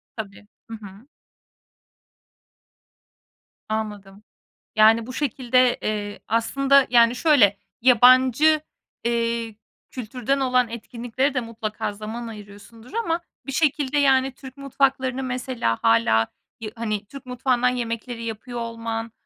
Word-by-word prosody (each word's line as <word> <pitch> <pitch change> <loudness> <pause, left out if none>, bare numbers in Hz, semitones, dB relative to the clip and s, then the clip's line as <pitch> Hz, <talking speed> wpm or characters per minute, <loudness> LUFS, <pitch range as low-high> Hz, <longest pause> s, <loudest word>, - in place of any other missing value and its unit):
Tabii, 205 -2 -8 0.2
hı 225 - -7
hı. 205 +5 -13 2.6
Anladım. 210 -2 -5 0.5
Yani 220 +1 +5
bu 255 - -7
şekilde 255 -2 +1
Eee, 205 -1 -3
aslında, 275 +4 +3
yani, 235 0 +5
şöyle: 250 -10 +4 0.2
Yabancı, 255 +5 +5 0.4
eee, 230 -1 -1 0.4
kültürden 255 +2 -3
olan 250 -2 +2
etkinliklere 240 +4 -3
de 255 - +1
mutlaka 225 -3 -5
zaman 215 +3 -7
ayırıyorsundur 215 - -12
ama 345 -8 -1 0.3
bir 275 - -4
şekilde, 290 -1 +1
yani, 265 -2 +3
Türk 265 -1 -12
mutfaklarını 270 -1 0
mesela 250 - -2
hâlâ 115 0 +3 0.3
yı 215 -1 -6
hani, 215 -3 -3
Türk 275 +5 -12
mutfağından 250 0 +1
yemekleri 235 -1 -4
yapıyor 235 +2 -6
olman, 230 -1 -5
235 Hz, 110 wpm, -23 LUFS, 220-260 Hz, 2.6 s, Yani